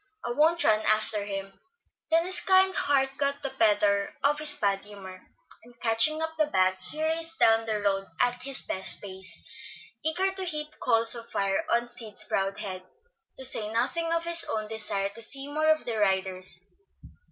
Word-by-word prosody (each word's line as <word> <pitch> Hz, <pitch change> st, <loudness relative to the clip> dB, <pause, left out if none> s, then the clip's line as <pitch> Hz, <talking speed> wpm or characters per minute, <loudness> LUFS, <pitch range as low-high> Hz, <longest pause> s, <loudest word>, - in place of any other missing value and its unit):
I 240 Hz, -, -3 dB
won't 320 Hz, +6 st, +2 dB
run 215 Hz, -1 st, +3 dB
after 215 Hz, -1 st, 0 dB
him;" 195 Hz, -1 st, -7 dB, 0.5 s
then 330 Hz, +1 st, +2 dB
his 375 Hz, +1 st, +1 dB
kind 380 Hz, 0 st, +5 dB
heart 270 Hz, -1 st, 0 dB
got 280 Hz, 0 st, -1 dB
the 275 Hz, -, -4 dB
better 205 Hz, -2 st, +1 dB
of 295 Hz, +2 st, +1 dB
his 300 Hz, -1 st, +4 dB
bad 195 Hz, -1 st, -1 dB
humor, 190 Hz, -3 st, -12 dB, 0.4 s
and 240 Hz, 0 st, -20 dB
catching 240 Hz, +8 st, +2 dB
up 320 Hz, 0 st, -5 dB
the 310 Hz, -, +2 dB
bag 185 Hz, -7 st, +1 dB
he 305 Hz, +12 st, -5 dB
raced 330 Hz, +1 st, -1 dB
down 225 Hz, 0 st, +3 dB
the 215 Hz, -1 st, -2 dB
road 195 Hz, -1 st, -1 dB
at 245 Hz, 0 st, 0 dB
his 275 Hz, 0 st, +4 dB
best 190 Hz, -, +1 dB
pace, 190 Hz, -1 st, -6 dB, 0.6 s
eager 360 Hz, +5 st, 0 dB
to 380 Hz, 0 st, -4 dB
heap 305 Hz, -4 st, -3 dB
coals 230 Hz, -2 st, +5 dB
of 230 Hz, -1 st, -3 dB
fire 195 Hz, -1 st, -2 dB
on 235 Hz, 0 st, 0 dB
Sid's 230 Hz, -3 st, -1 dB
proud 195 Hz, 0 st, -2 dB
head, 190 Hz, -3 st, -5 dB, 0.6 s
to 265 Hz, -, -5 dB
say 215 Hz, -4 st, +3 dB
nothing 330 Hz, +9 st, -2 dB
of 335 Hz, 0 st, 0 dB
his 340 Hz, 0 st, +5 dB
own 215 Hz, -1 st, -3 dB
desire 210 Hz, -3 st, -2 dB
to 220 Hz, +3 st, -11 dB
see 275 Hz, +5 st, +3 dB
more 310 Hz, +2 st, -1 dB
of 310 Hz, 0 st, +1 dB
the 225 Hz, -3 st, -3 dB
riders. 190 Hz, -2 st, -1 dB
230 Hz, 185 wpm, -26 LUFS, 200-305 Hz, 0.6 s, kind